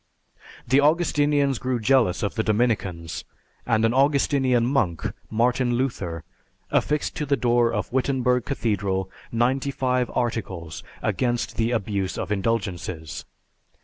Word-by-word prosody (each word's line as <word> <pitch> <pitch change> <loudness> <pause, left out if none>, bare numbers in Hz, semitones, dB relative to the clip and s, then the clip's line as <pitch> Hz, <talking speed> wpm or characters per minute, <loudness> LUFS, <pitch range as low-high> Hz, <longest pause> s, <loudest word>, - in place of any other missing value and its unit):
The 130 +4 +4
Augustinians 145 -4 +2
grew 125 0 -1
jealous 115 -5 +2
of 100 - -1
the 110 - 0
Dominicans, 105 -7 -1 0.4
and 115 -2 +3
an 115 - +2
Augustinian 135 -3 +3
Monk, 115 - 0 0.3
Martin 120 +2 +1
Luther, 95 -11 -2 0.5
affixed 150 0 0
to 150 - -1
the 140 0 +2
door 120 -1 +3
of 105 +1 -3
Wittenberg 130 -2 +1
Cathedral 100 -7 -1 0.2
ninety 125 +4 +1
five 125 -2 0
articles 95 - -3 0.2
against 120 -2 -1
the 115 0 +1
abuse 100 -5 -1
of 95 - -4
indulgences. 95 -7 -2
120 Hz, 120 wpm, -24 LUFS, 100-130 Hz, 0.5 s, The